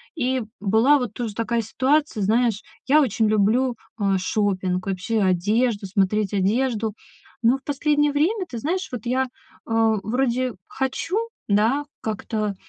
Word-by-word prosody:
И 260 -3 0 0.2
была 225 +8 +4
вот 245 -5 -4
тоже 230 -3 -4
такая 230 +2 -1
ситуация, 265 +2 +1
знаешь, 225 +1 +2 0.3
я 300 +3 +6
очень 225 -4 +1
люблю, 220 +5 +2 0.2
э, 195 -2 +2
шопинг, 185 -2 -1
вообще 195 +4 -1
одежду, 205 +4 +1
смотреть 200 +1 +1
одежду. 220 +2 +1 0.5
Но 240 +4 +4
в 270 - -23
последнее 295 +1 +1
время, 360 +8 +1
ты 240 - -6
знаешь, 355 +10 -2
вот 245 -3 -6
я, 260 +2 +1 0.4
э, 225 -1 +3
вроде 250 +1 0
хочу, 265 +8 -2 0.3
да, 225 +8 +2 0.2
как-то, 215 -1 -2
230 Hz, 135 wpm, -23 LUFS, 210-265 Hz, 0.5 s, я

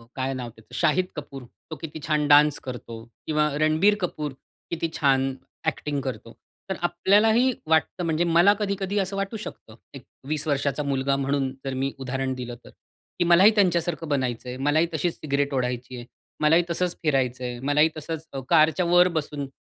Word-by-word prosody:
काय 130 0 -2
नाव 125 -2 -5
त्याचं 110 -1 -15
शाहिद 175 +2 +2
कपूर, 140 -3 -8
तो 160 +6 -12
किती 160 -1 -6
छान 150 -1 +1
डान्स 150 0 +6
करतो 120 -3 -7 0.2
किंवा 150 -1 +2
रणबीर 155 +7 +4
कपूर 150 -5 -3 0.4
किती 165 -1 -2
छान 135 -2 +2 0.3
एक्टिंग 145 -2 -1
करतो. 115 -3 -6 0.4
तर 190 - -1
आपल्याला 205 +5 +3
ही 250 +3 +4
वाटतं, 160 +2 +1
म्हणजे 165 0 +1
मला 170 +4 +5
कधी-कधी 200 -1 -2
असं 195 +1 -2
वाटू 195 +3 -3
शकतं. 110 - -10 0.2
एक 135 - -10 0.2
20 155 +1 -2
वर्षाचा 145 0 0
मुलगा 140 -1 0
म्हणून 135 0 0 0.2
जर 135 - -2
मी 135 +1 -1
उदाहरण 135 0 -2
दिलं 125 -1 -6
तर - - -12 0.5
की - - +4
मलाही 175 +5 +7
त्यांच्यासारखं 175 -4 +1
बनायचं 125 -3 -1
आहे. 125 - -6
मलाही 145 +5 +2
तशीच 165 +2 0
सिगारेट 140 -1 -1
ओढायची 125 -1 -2
आहे, 120 - -8 0.4
मलाही 160 +3 +5
तसंच 175 +1 -1
फिरायचं 130 -4 0
आहे, 120 -1 -4
मलाही 145 +4 +3
तसंच 160 +1 -6
अ, 135 - -3
कारच्या 160 +2 +4
वर 175 +1 +5
बसून, 150 -4 -3
150 Hz, 175 wpm, -25 LUFS, 135-170 Hz, 0.5 s, मलाही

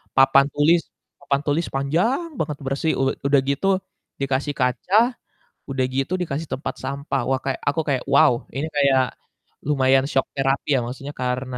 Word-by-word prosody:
papan 135 +1 +6
tulis 160 +4 +4 0.4
papan 140 0 0
tulis 155 +3 +1
panjang 175 - 0
banget 150 -2 -2
bersih. 135 +4 0
U - - +2 0.2
udah 140 -1 +4
gitu 140 +7 0 0.5
dikasih 135 +2 0
kaca, 125 +10 0 0.7
udah 135 -1 0
gitu 135 +6 -1
dikasih 155 -2 -3
tempat 135 - -4
sampah, 140 +2 -2
wah 135 - +1
kayak 135 - -2
aku 160 - 0
kayak 130 -3 0
wow 140 - +6 0.2
ini 140 +4 -2
kayak 140 -2 +4 0.7
lumayan 135 -2 +3
shock 135 - +2
therapy 135 +1 0
ya, - - +3
maksudnya 135 +4 -7
karena 125 0 -2
140 Hz, 155 wpm, -22 LUFS, 135-150 Hz, 0.7 s, papan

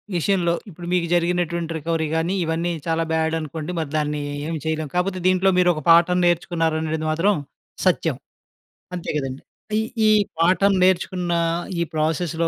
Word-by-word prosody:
విషయంలో, 175 0 +1 0.2
ఇప్పుడు 175 -1 -9
మీకు 175 -2 +1
జరిగినటువంటి 170 -1 0
రికవరీ 160 0 -1
కానీ 165 +3 0
ఇవన్నీ 165 +2 -1 0.2
చాలా 165 0 +1
బ్యాడ్ 160 0 +1
అనుకోండి. 155 +1 -5
మరి 160 -3 -3
దాన్ని 150 0 -1 0.3
ఏం 165 - -2
చేయలేం. 155 -1 -1
కాకపోతే 185 +1 0
దీంట్లో 185 +1 +3
మీరు 180 0 +5
ఒక 155 - -5
పాఠం 170 +2 +6
నేర్చుకున్నారనేది 165 -2 0
అనెడిదీ 155 0 -2
మాత్రం 180 +6 +2 0.5
సత్యం. - - +2 0.8
అంతే 175 - -6
కదండీ. 135 -2 -4 0.4
ఈ - - +2 0.3
ఈ - - +6 0.3
పాఠం 185 +4 +4
నేర్చుకున్న 180 -1 +1 0.5
ఈ - - +2
ప్రాసెస్‌లో 160 +1 0
170 Hz, 150 wpm, -22 LUFS, 160-180 Hz, 0.8 s, పాఠం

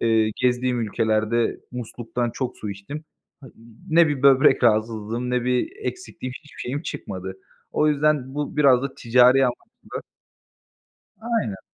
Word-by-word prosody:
Eee, 110 -1 +3
gezdiğim 125 -1 +1
ülkelerde 110 +1 0
musluktan 120 0 -4
çok 130 +1 -4
su 105 - -5
içtim. 100 +11 -8 0.4
Ha, 135 - -12 0.4
ne 165 0 +6
bir 145 -3 -2
böbrek 135 -2 +5
rahatsızlığım 110 +2 0
ne 125 -1 0
bir 125 - 0
eksiklikğim, 180 - -5
hiçbir 150 - -13
şeyim 140 +5 -3
çıkmadı. 95 - -6 0.4
O 155 - +2
yüzden 145 -3 +1
bu 145 0 -4
biraz 135 -4 +5
da 140 - -4
ticari 125 +2 +5
anlamda 125 -1 -5 1.2
Aynen. 220 - -2
125 Hz, 135 wpm, -23 LUFS, 115-140 Hz, 1.2 s, ne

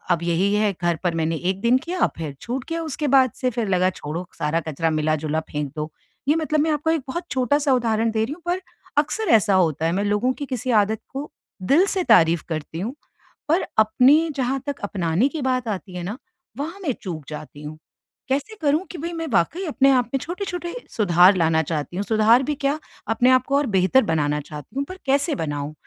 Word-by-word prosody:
अब 170 -1 +2
यही 175 +4 +1
है 210 -1 +2
घर 170 -1 +2
पर 170 -2 +1
मैंने 165 0 0
1 185 +4 -2
दिन 240 +3 +4
किया, 350 +5 0
फिर 155 -4 -5
छूट 250 +2 -4
किया 330 0 -3
उसके 300 -1 -3
बाद 260 -3 +5
से 255 - 0
फिर 230 -3 -2
लगा 185 0 +2
छोड़ो 170 +1 -6
सारा 160 +1 0
कचरा 160 +2 0
मिला-जुला 155 0 0
फेंक 145 -2 -3
दो। 150 +1 -3 0.4
ये 300 - +4
मतलब 310 -2 0
मैं 315 +1 +2
आपको 305 +2 0
एक 320 -4 +1
बहुत 345 +6 -3
छोटा-सा 275 +3 +1
उदाहरण 225 -2 +1
दे 220 0 +1
रही 265 - -4
हूँ, 340 - -19
पर 360 +2 0 0.4
अक्सर 440 +8 -4
ऐसा 200 -1 +1
होता 160 -4 +2
है 165 - +1
मैं 200 +3 0
लोगों 210 +5 +1
की 285 - -6
किसी 250 +1 -3
आदत 220 +1 -4
को 280 +2 -5 0.3
दिल 305 - +4
से 380 -3 -1
तारीफ़ 165 0 +4
करती 160 +1 -4
हूँ, 230 +7 -3 0.6
पर 340 +4 +2
अपनी 270 +9 +5
जहाँ 265 +1 0
तक 285 - -3
अपनाने 190 +3 +1
की 310 -1 -5
बात 255 -2 0
आती 190 -3 -4
है 180 - -4
ना, 200 +7 -4 0.4
वहाँ 330 +7 -5
मैं 290 - +1
चूक 165 -6 -5
जाती 150 -1 -9
हूँ। 155 +1 -7 0.5
कैसे 280 +11 -1
करूँ 305 +5 +2
कि 360 - -7
भई 335 +3 -4
मैं 330 -1 -4
वाक़ई 325 - +1
अपने 275 -3 +3
आप 250 -2 +3
में 270 - +1
छोटे-छोटे 355 +1 -5 0.2
सुधार 185 -2 +5
लाना 160 -1 +3
चाहती 155 +3 -4
हूँ। 200 - 0
सुधार 225 +3 +4
भी 295 +2 -1
क्या, 285 +2 -1 0.3
अपने 250 +3 +4
को 280 0 +2
और 290 - +1
बेहतर 190 +9 +4
बनाना 150 -5 0
चाहती 150 - -10
हूँ, 280 - +1
पर 370 - -9
कैसे 280 +3 +1
बनाऊँ? 145 - -3
225 Hz, 215 wpm, -23 LUFS, -, 0.6 s, बाद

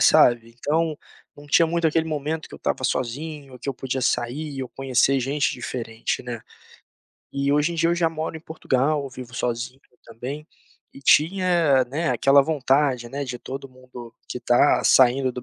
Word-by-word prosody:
sabe. 115 -1 +4
Então, 155 +3 0 0.4
não 145 0 -13
tinha 165 +3 +4
muito 170 0 0
aquele 160 +1 +1
momento 155 +1 -3
que - - -12
eu - - -8
estava 130 - -2
sozinho, 135 +2 -3
que 140 - -7
eu 135 - -1
podia 130 +1 -3
sair 135 +3 -2
ou 130 - -6
conhecer 135 +1 +1
gente 140 +3 0
diferente, 115 -2 -4
né. 120 -2 -6 0.9
E, 140 0 0
hoje 150 +3 +2
em - - -5
dia, 165 0 +2
eu 170 - +2
já 170 -1 +2
moro 160 0 -4
em - - -10
Portugal, 145 -2 -1
vivo 125 0 -10
sozinho 125 +1 -3 0.2
também, 130 +7 -7 0.5
e - - -13
tinha, 165 -3 +3
né, 150 +7 -2
aquela 135 +3 +5
vontade, 135 -4 +1
né, 140 +3 -4
de 125 -2 -5
todo 135 +2 -8
mundo 125 -2 -12
que - - -4
está 125 +3 +3
saindo 130 0 +4
do 125 - -7
135 Hz, 175 wpm, -23 LUFS, 125-155 Hz, 0.9 s, aquela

